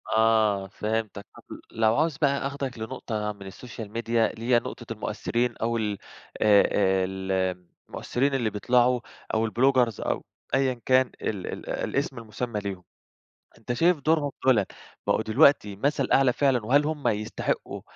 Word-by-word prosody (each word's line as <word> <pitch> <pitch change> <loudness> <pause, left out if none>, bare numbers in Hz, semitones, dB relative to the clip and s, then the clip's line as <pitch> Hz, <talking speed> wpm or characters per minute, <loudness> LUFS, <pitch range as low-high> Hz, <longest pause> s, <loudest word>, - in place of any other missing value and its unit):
آه 110 -3 +3
فهمتك، 105 0 -3
طب - - -14 0.3
لو 110 0 +2
عاوز 155 -2 +1
بقى 140 -3 +1
آخدك 135 -4 -5
لنقطة 110 -2 -4
من 100 -1 -11
السوشيال 110 +1 -9
ميديا، 115 0 0
اللي 115 +1 -8
هي 120 -1 +4
نقطة - - -8
المؤثرين 120 +1 -2
أو 115 +1 -1
ال 105 -3 -2 0.4
آآ، 105 -2 +6
آآ، 95 -2 +2 0.8
المؤثرين 135 +3 -1
اللي 120 -5 +1
بيطلعوا 120 +4 +2 0.3
أو 110 +1 +2
الbloggers 125 -2 +2
أو - - -2 0.3
أيًا 135 -1 +2
كان 130 -1 +4
ال 100 -4 -3
ال - - -6
الاسم 135 -1 -2
المسمى 115 0 -4
ليهم، 95 -3 -5 0.7
أنت 115 +2 -4
شايف 165 +3 +3
دورهم 150 -1 +1
دولًا 115 -7 +4 0.4
بقوا - - +2
دلوقتي 110 -3 +4
مثل 135 +4 0
أعلى 135 -2 +4
فعلًا، 130 -6 +1
وهل 145 +5 +4
هُم 155 -2 -2
يستحقوا 110 0 -2
115 Hz, 145 wpm, -26 LUFS, 105-135 Hz, 0.8 s, آآ